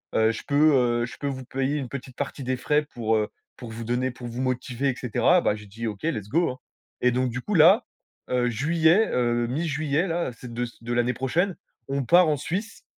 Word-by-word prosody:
heu, 110 0 +4
je 115 - -6
peux, 150 +2 +5 0.3
heu, - - 0
je 125 - -10
peux 145 - -3
vous 130 -1 -4
payer 135 +3 -1
une 130 -4 -4
petite 130 -2 -7
partie 145 0 -4
des 130 - 0
frais 150 +4 +1
pour, 110 -2 +1
heu, 105 -1 0 0.3
pour 120 -2 -8
vous 115 +1 -6
donner 125 +3 0
pour 120 0 -9
vous 120 +2 -5
motiver» 130 +1 -1
et 130 - -1
cetera. 125 +9 +2
Bah, - - +2
j'ai 105 -1 -11
dit: 115 +4 -7
«OK, 105 +2 -6
let's 105 -11 -2
go! 165 +5 +2
Hein» 125 - -9 0.4
et 125 - +4
donc 130 +1 0
du 125 - -4
coup, 210 - -4
là, 180 +9 +6 0.4
heu, 125 -1 +1
juillet, 160 - +3
heu, 120 -1 +1
mi-juillet, 150 +4 0
là, 170 -6 -1
c'est 120 -1 -9
de 120 +1 -1
c 120 - -12
de 120 +1 -3
l'année 120 +1 +1
prochaine, 165 - 0 0.3
on 140 -1 -1
part 175 +3 +6
en 150 - +1
Suisse, 200 - -4
130 Hz, 230 wpm, -25 LUFS, 120-155 Hz, 0.4 s, là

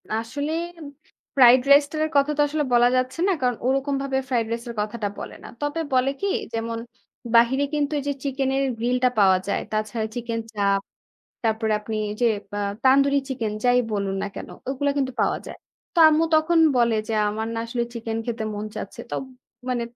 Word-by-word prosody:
আসলে 260 +7 -3 0.3
M 315 - -9 0.5
fried 250 -1 +7
রাইসটার 295 +2 +4
কথা 280 +1 +4
তো - - +4
আসলে 300 +1 -1
বলা 240 0 +6
যাচ্ছে 255 +4 -1
না। - - +3
কারণ 250 -1 +1
ওরকমভাবে 275 0 0
ফ্রাইড 240 -3 +1
রাইসের 235 +1 -4
কথাটা 210 0 -3
বলে - - -7
না। - - -9
তবে 290 +3 -2
বলে 255 +1 +3
কি? 400 - 0 0.3
যেমন, 230 0 -2 0.6
বাহিরে 240 +4 +5
কিন্তু 295 0 0
এইযে 285 0 -2
চিকেনের 270 -1 0
গ্রিল 240 +2 0
টা 250 - +6
পাওয়া 190 -2 +6
যায়। 200 - 0
তাছাড়া 215 +1 -2
চিকেন 235 -1 -3
চাপ, 200 -1 +1 0.6
তারপরে 220 0 +1
আপনি 220 +1 -5 0.2
ওইযে 215 +3 0 0.3
অ্যা 205 - -2 0.2
তান্দুরি 275 +2 +5
চিকেন 230 -5 -2
যাই 245 0 +5
বলুন 200 -2 -1
না - - -1
কেন, - - -7 0.2
ওগুলা 280 +2 0
কিন্তু 265 -2 0
পাওয়া - - +1
যায়। - - -9 0.4
তো - - 0
আম্মু 315 +1 +3
তখন 315 +2 +3 0.2
বলে 235 -2 +3
যে, - - -2 0.2
"আমার 220 +2 -3
না - - -2
আসলে 235 0 -1
চিকেন 225 -1 -4
খেতে 230 -2 -3
মন 205 +1 -4
চাচ্ছে।" - - -6
তোম - - -3 0.4
মানে 245 -2 0
250 Hz, 180 wpm, -24 LUFS, 225-275 Hz, 0.6 s, ফ্রাইড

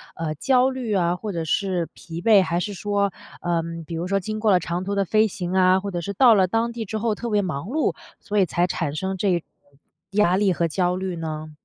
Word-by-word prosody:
呃， 160 -2 -3
焦 255 - +3
虑 255 -5 -3
啊， 175 -2 +2
或 210 +2 -5
者 165 -2 -3
是 180 -1 0
疲 170 0 -8
惫， 215 -2 +6
还 170 0 -1
是 205 +2 -3
说 200 0 0 0.3
呃， 170 -1 0 0.2
比 165 - -6
如 170 +2 -3
说 195 +1 +1
经 215 +3 -4
过 215 -1 +3
了 180 - +5
长 175 +2 -3
途 200 +1 -2
的 200 - +2
飞 215 +3 +3
行 180 -2 -5
啊， 185 0 +4
或 200 +1 -5
者 175 -2 -3
是 200 - -4
到 235 +3 +6
了 190 -3 +4
当 225 +4 0
地 230 -1 -5
之 215 +2 -4
后 215 -1 0
特 235 - -5
别 210 -2 +2
忙 170 -5 -3
碌， 305 +6 0 0.2
所 210 0 -3
以 190 - +5
才 175 +2 0
产 145 -4 -2
生 190 +3 -2
这 180 -2 +1
种 - - -17 0.7
压 195 -3 +3
力 195 -3 +3
和 170 0 0
焦 180 +2 0
虑 185 -1 -3
呢？ 155 -1 -5
190 Hz, 265 characters per minute, -23 LUFS, 175-210 Hz, 0.7 s, 惫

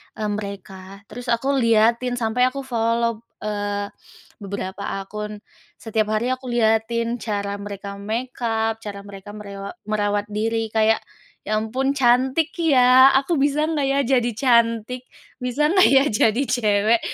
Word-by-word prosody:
mmm, 210 -1 -2
mereka," 195 -1 -9
terus 245 +3 -8
aku 240 +4 +1
liatin 230 +2 +3
sampai, 245 +2 +1
aku 275 +2 -4
follow, 230 -2 0 0.2
eee, 205 -1 -3 0.5
beberapa 200 -1 -5 0.2
akun. 210 +1 -7 0.3
Setiap 220 -1 -2
hari 240 +4 0
aku 255 0 -4
liatin 230 0 +1
cara 200 -2 -3
mereka 200 0 -7
makeup, 225 0 -2
cara 200 -2 -8
mereka 200 +1 -11
merewa 200 - -8
merawat 205 -1 0
diri, 225 +1 -1
kayak, 220 0 +2 0.4
"Ya 215 0 0
ampun 255 +5 -1
cantik 265 +3 +2
ya. 260 -5 +6
Aku 320 +5 -1
bisa 290 +2 +1
nggak 295 -4 0
ya 275 - +1
jadi 245 -3 +2
cantik? 235 -1 +2 0.4
Bisa 280 +5 +1
nggak 375 -1 +6
ya, 270 0 +6
jadi 220 +3 +2
cewek 215 -1 +2
225 Hz, 135 wpm, -22 LUFS, 210-250 Hz, 0.5 s, ya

